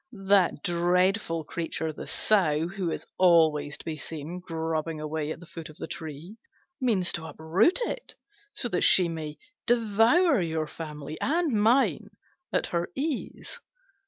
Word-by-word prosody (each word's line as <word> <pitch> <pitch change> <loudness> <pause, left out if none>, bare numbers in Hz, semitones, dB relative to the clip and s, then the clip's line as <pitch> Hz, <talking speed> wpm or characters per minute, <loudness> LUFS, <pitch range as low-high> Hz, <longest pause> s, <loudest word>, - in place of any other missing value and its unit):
That 190 -6 +3
dreadful 175 0 +1
creature, 160 -1 -3
the - - -8
Sow, 165 -7 +2
who 190 -2 -3
is - - -4
always 160 -5 +4
to - - -12
be 160 -2 -4
seen 160 +4 -6
grubbing 160 -2 -3
away 155 0 -3
at - - -6
the 175 - -12
foot 165 -1 -9
of 155 - -14
the - - -5
tree, 160 +6 -8 0.4
means 210 -8 +2
to 160 -1 -4
uproot 180 - +2
it, - - -5 0.5
that 215 -8 0
she 180 -2 +6
may 155 -2 -5 0.3
devour 230 - +4
your 160 -2 -1
family 150 -1 -8
and 325 +2 +1
mine 225 +6 +3 0.4
at - - +1
her 170 0 0
ease." 290 -1 -4
170 Hz, 145 wpm, -27 LUFS, 160-205 Hz, 0.5 s, she